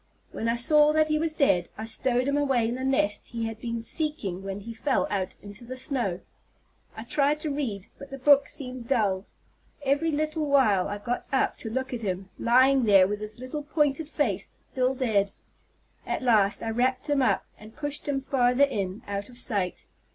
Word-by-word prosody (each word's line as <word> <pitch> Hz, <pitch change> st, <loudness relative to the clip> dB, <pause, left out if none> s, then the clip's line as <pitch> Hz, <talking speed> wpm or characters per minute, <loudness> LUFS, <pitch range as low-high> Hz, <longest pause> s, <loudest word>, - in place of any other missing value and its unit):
When 225 Hz, -, -3 dB
I 230 Hz, -, +2 dB
saw 300 Hz, +5 st, +4 dB
that 310 Hz, 0 st, +3 dB
he 305 Hz, 0 st, +2 dB
was 320 Hz, -1 st, -1 dB
dead, 180 Hz, -, +2 dB
I 220 Hz, -, -5 dB
stowed 250 Hz, +2 st, 0 dB
him 280 Hz, -, +1 dB
away 270 Hz, -5 st, +2 dB
in 235 Hz, -, -2 dB
the 260 Hz, +1 st, -4 dB
nest 265 Hz, -6 st, +1 dB
he 230 Hz, -1 st, -4 dB
had 225 Hz, 0 st, -6 dB
been 230 Hz, -1 st, -3 dB
seeking 230 Hz, -, 0 dB
when 195 Hz, +1 st, -5 dB
he 230 Hz, +3 st, -7 dB
fell 260 Hz, +4 st, 0 dB
out 190 Hz, -2 st, -2 dB
into 205 Hz, +2 st, -10 dB
the 255 Hz, +2 st, -7 dB
snow. 245 Hz, -, -2 dB, 0.8 s
I 220 Hz, -, -5 dB
tried 290 Hz, +4 st, +1 dB
to 305 Hz, -, -1 dB
read; 230 Hz, -9 st, -3 dB
but 280 Hz, -, -10 dB
the 275 Hz, -, -7 dB
book 280 Hz, +1 st, +5 dB
seemed 250 Hz, -3 st, -6 dB
dull. 205 Hz, -7 st, +1 dB, 0.6 s
Every 285 Hz, +4 st, +1 dB
little 310 Hz, +1 st, -1 dB
while 220 Hz, -10 st, +3 dB
I 205 Hz, -, -4 dB
got 235 Hz, +4 st, -4 dB
up 265 Hz, -, +1 dB
to 225 Hz, -, -5 dB
look 260 Hz, +3 st, -3 dB
at 240 Hz, -, -4 dB
him, 190 Hz, -2 st, -4 dB
lying 260 Hz, +2 st, +4 dB
there 195 Hz, -3 st, +6 dB
with 205 Hz, +1 st, -3 dB
his 210 Hz, 0 st, -7 dB
little 255 Hz, +4 st, -5 dB
pointed 295 Hz, 0 st, 0 dB
face, 210 Hz, -, -2 dB
still 255 Hz, 0 st, +1 dB
dead. 210 Hz, -6 st, +1 dB, 0.7 s
At -, -, -3 dB
last 215 Hz, -4 st, +3 dB
I 225 Hz, -, -2 dB
wrapped 255 Hz, +4 st, 0 dB
him 290 Hz, -2 st, +2 dB
up, 255 Hz, -, +2 dB
and 215 Hz, +1 st, -13 dB
pushed 290 Hz, -1 st, -4 dB
him 275 Hz, -2 st, 0 dB
farther 260 Hz, 0 st, +2 dB
in, 200 Hz, -7 st, -1 dB
out 200 Hz, +1 st, -4 dB
of 245 Hz, -, -12 dB
sight. 200 Hz, -7 st, -2 dB
250 Hz, 200 wpm, -27 LUFS, 210-280 Hz, 0.8 s, there